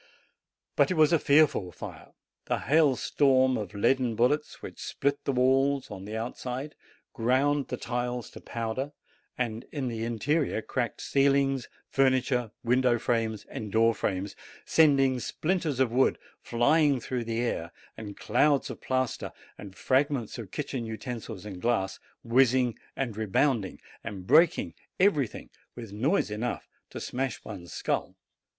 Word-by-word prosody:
But - - +4
it 185 - 0
was 155 +1 +5
a 165 - +5
fearful 140 - +3
fire, - - -10 0.3
a - - +1
hailstorm 135 -3 +3
of 105 -3 -5
leaden 120 +2 +2
bullets, 135 +6 0
which - - -8
split 140 +1 -1
the - - +1
walls 135 +2 +2
on 95 0 -7
the 110 +2 -5
outside, 125 +4 -5 0.4
ground 135 +4 +1
the 125 - -4
tiles 125 0 -3
to - - -11
powder, 120 +5 -4 0.4
and 115 -2 -2
in 135 -5 -2
the 115 -1 -4
interior 120 +2 0
cracked 120 -3 -3
ceilings, 135 -1 +2 0.2
furniture, 130 -3 +2
window 125 0 +3
frames, 115 -2 -1
and 105 -2 -6
door 115 +1 +4
frames, 95 -1 -3 0.3
sending 135 -5 +4
splinters 155 0 -1
of 130 -3 +2
wood 130 +2 +3 0.2
flying 140 +3 +3
through 120 0 -3
the 115 0 -2
air, 85 -8 -2 0.2
and 105 -2 -8
clouds 140 +5 +2
of - - -10
plaster, 130 -2 -1 0.2
and 100 -2 -11
fragments 130 -3 0
of 110 -5 -7
kitchen 135 +1 -4
utensils 110 -3 -6
and 95 -4 -7
glass, 115 -5 0 0.2
whizzing, 125 0 +3 0.2
and 125 -6 -3
rebounding, 110 0 0 0.2
and 95 -3 -7
breaking 160 - +4 0.3
everything 155 - +1 0.2
with 115 -4 -8
noise 125 - +1
enough 110 +4 -3 0.2
to - - -7
smash 130 -2 -3
one's 90 -5 -8
skull. - - -2
125 Hz, 140 wpm, -28 LUFS, 110-140 Hz, 0.4 s, was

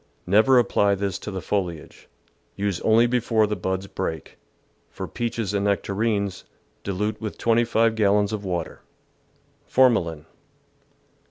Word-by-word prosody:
Never 110 +8 +5
apply 100 -4 +3
this 100 -2 -3
to - - -7
the 95 -4 -5
foliage. 90 -6 -4 0.5
Use 100 -2 -2
only 115 +2 +4
before 120 -2 +2
the 105 0 -2
buds 95 0 -3
break. 80 -6 -5 0.5
For - - -7
peaches 115 -4 -3
and 100 0 0
nec 100 -1 +1
tarines, 100 -2 -1 0.4
dilute 105 +2 -2
with 110 -2 -5
25 115 -1 +2
gallons 105 -1 +2
of 105 -1 -4
water. 90 -3 -4 0.9
Formalin. 90 -12 +2
105 Hz, 125 wpm, -24 LUFS, 95-115 Hz, 0.9 s, Never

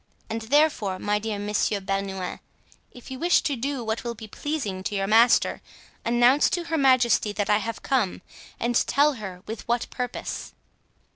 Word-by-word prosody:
And 225 +1 -2
therefore, 225 -6 +2
my 210 +2 0
dear 215 -1 -3
Monsieur 205 0 0
Bernouin, 195 -1 -3 0.5
if 245 +1 -13
you 260 - -6
wish 345 +2 +4
to 290 -5 -1
do 265 +1 -3
what 220 +1 -2
will 235 -1 -4
be 220 0 -10
pleasing 215 -6 -4
to 205 - -2
your 195 0 0
master, 230 +4 +4 0.4
announce 240 +4 +4
to 350 - -1
her 325 -1 -2
majesty 255 -5 +4
that 205 0 -1
I 210 - +4
have 230 +1 -5
come, 210 -9 0 0.4
and 235 +1 0
tell 290 +2 +3
her 185 -3 -7
with 220 +1 -7
what 240 0 0
purpose." 250 0 -5
230 Hz, 170 wpm, -25 LUFS, 205-260 Hz, 0.5 s, wish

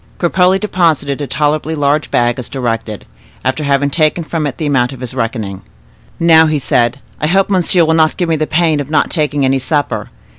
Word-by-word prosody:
Cropole 180 +1 +2
deposited 160 -8 0
a 145 - -3
tolerably 150 +2 -1
large 145 0 0
bag 120 +1 +1
as 125 - -6
directed, 115 -5 -4 0.4
after 130 +4 -1
having 140 0 +1
taken 155 +2 +1
from 155 -1 -2
it 135 - -6
the 160 - -3
amount 130 -3 +1
of 130 - -11
his 125 0 -6
reckoning. 110 -6 -3 0.6
"Now," 160 -1 +5
said 120 -3 +1
he, 140 - -22 0.2
"I 150 - 0
hope 195 +4 +2
monsieur 180 -2 +3
will 160 - +2
not 160 -1 +2
give 175 - -1
me 165 - +1
the 155 0 -1
pain 160 -2 +1
of 145 - -5
not 155 - +1
taking 145 -4 0
any 135 0 +1
supper. 145 +2 -2
150 Hz, 200 wpm, -14 LUFS, 130-160 Hz, 0.6 s, Now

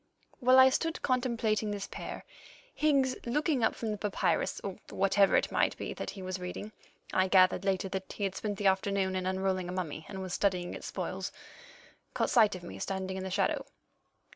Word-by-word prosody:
While 255 0 +5
I 260 0 +9
stood 325 +5 -1
contemplating 235 -5 +1
this 205 -1 -3
pair, - - -7 0.5
Higgs, 275 -4 +2
looking 280 +1 0
up 220 - +2
from 225 -2 -3
the 210 - -4
papyrus 205 -1 0
or 195 -2 -4
whatever 195 +1 +3
it - - +2
might - - +1
be - - -4
that - - -5
he 195 - -8
was 185 0 -4
reading 180 +4 -6 0.4
(I 185 0 +3
gathered 185 0 +5
later 195 -1 0
that 190 0 -4
he 205 - -5
had 195 -1 0
spent 205 0 -3
the 205 - -4
afternoon 190 0 +2
in 185 0 -1
unrolling 190 -1 -1
a - - -3
mummy, 160 -4 -4
and 190 - -6
was 185 -1 -5
studying 180 -3 0
its - - -7
spoils), - - -4 0.8
caught - - +1
sight 215 -5 +5
of 180 - -9
me 175 - -8
standing 190 -1 -3
in 190 - -4
the 190 - -4
shadow. 190 - 0
195 Hz, 195 wpm, -31 LUFS, 185-220 Hz, 0.8 s, I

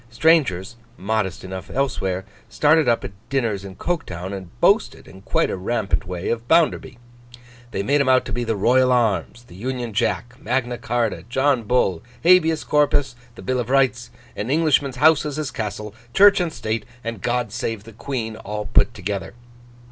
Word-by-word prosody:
Strangers, 120 - +2 0.2
modest 100 -1 -2
enough 95 0 -7
elsewhere, 95 -9 -1 0.2
started 155 -2 +3
up 115 - +1
at - - -6 0.2
dinners 115 -8 -1
in 95 -1 -9
Coketown, 95 - -4
and 95 -3 -7
boasted, 205 - +2
in 95 - -14
quite - - 0
a - - -2
rampant 100 -1 -1
way, 90 0 -4
of 115 0 -2
Bounderby. 160 -6 +2 0.7
They 100 -4 -3
made 140 +6 +2
him 135 - +1
out 130 0 +4
to - - -7
be 120 - -1
the 115 -1 -1
Royal 125 +5 +3
arms, 120 0 0
the 105 - -17
Union 120 +3 -4
Jack, 120 +4 -2
Magna 120 +1 -1
Charta, 120 -3 -1
John 130 -2 +1
Bull, 105 -7 +1 0.2
Habeas 165 -2 +4
Corpus, 145 -3 +1 0.2
the - - -11
Bill 130 0 -1
of 120 0 -3
Rights, 130 -3 +2 0.3
An 105 - -4
Englishman's 145 -3 +2
house 155 +3 +4
is 150 -2 -4
his 150 -2 -3
castle, 105 -1 -5 0.2
Church 200 0 +7
and 175 -2 -1
State, 110 -4 -3 0.2
and 115 -4 -5
God 120 -2 -1
save 115 -3 -3
the 115 +1 -13
Queen, 115 -2 -4
all 105 -1 -5
put - - +3
together. 100 +2 -4
120 Hz, 175 wpm, -22 LUFS, 105-140 Hz, 0.7 s, Church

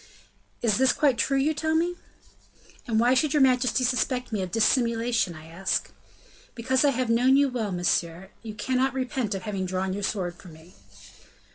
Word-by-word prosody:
"Is 215 -4 +2
this 265 0 +4
quite 275 -6 +1
true 275 - +1
you 290 +4 +1
tell 315 +1 -1
me?" 340 +2 +1 0.9
"And 220 -2 +1
why 240 +2 +4
should 300 +3 +1
your 295 - +4
majesty 255 0 +2
suspect 250 0 -1
me 210 -3 -2
of 185 - -4
dissimulation, 230 - +1
I 155 0 -12
ask?" 170 +4 -2 0.6
"Because 255 +3 +1
I 290 - +5
have 255 -2 -1
known 255 +3 +4
you 280 -1 +3
well, 230 -5 -3
monsieur; 175 0 -1
you 220 -2 -8
cannot 260 +4 -1
repent 255 -5 -2
of 190 - -6
having 195 -3 -3
drawn 185 +1 -2
your 205 - -4
sword 190 -3 -2
for 185 +1 -16
me." 160 +1 -15
235 Hz, 180 wpm, -26 LUFS, 190-260 Hz, 0.9 s, I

